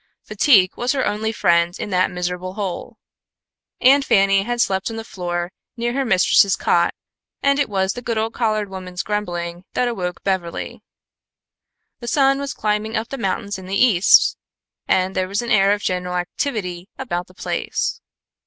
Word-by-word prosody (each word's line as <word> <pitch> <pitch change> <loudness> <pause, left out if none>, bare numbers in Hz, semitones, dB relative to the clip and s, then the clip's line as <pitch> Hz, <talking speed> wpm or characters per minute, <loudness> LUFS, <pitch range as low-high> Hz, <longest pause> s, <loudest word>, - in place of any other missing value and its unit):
Fatigue 195 -10 +4
was 245 +3 0
her 265 -2 0
only 215 +2 -1
friend 170 -4 +2
in 205 - -5
that 185 0 +2
miserable 180 0 -4
hole. 195 -4 -5 0.8
Aunt 275 +3 +6
Fanny 195 -4 +4
had 240 +4 -3
slept 190 -3 +1
on 225 - -6
the 225 - -5
floor 175 -4 -4 0.3
near 240 +1 -1
her 275 +1 0
mistress's 195 -2 +4
cot, - - +1 0.5
and 280 0 +3
it 285 - +1
was 190 -1 0
the 245 - -7
good 230 -2 -2
old 220 +1 -1
colored 215 -3 0
woman's 185 -2 -6
grumbling 175 -4 -3
that 250 - +2
awoke 180 -7 -4
Beverly. 185 -3 -3 1.2
The 240 - -8
sun 275 +2 +3
was 280 0 -4
climbing 215 +1 -1
up 225 +2 -3
the 275 - -5
mountains 200 -1 -2
in 185 - -10
the 195 +1 -1
east, 205 -7 +5 0.5
and 185 0 +1
there 185 0 0
was 200 +5 -2
an 240 - -4
air 195 -3 +5
of 205 0 0
general 180 0 -2
activity 180 -2 -3
about 180 -10 -3
the 185 - -20
place. - - -2
200 Hz, 170 wpm, -21 LUFS, 185-230 Hz, 1.2 s, Aunt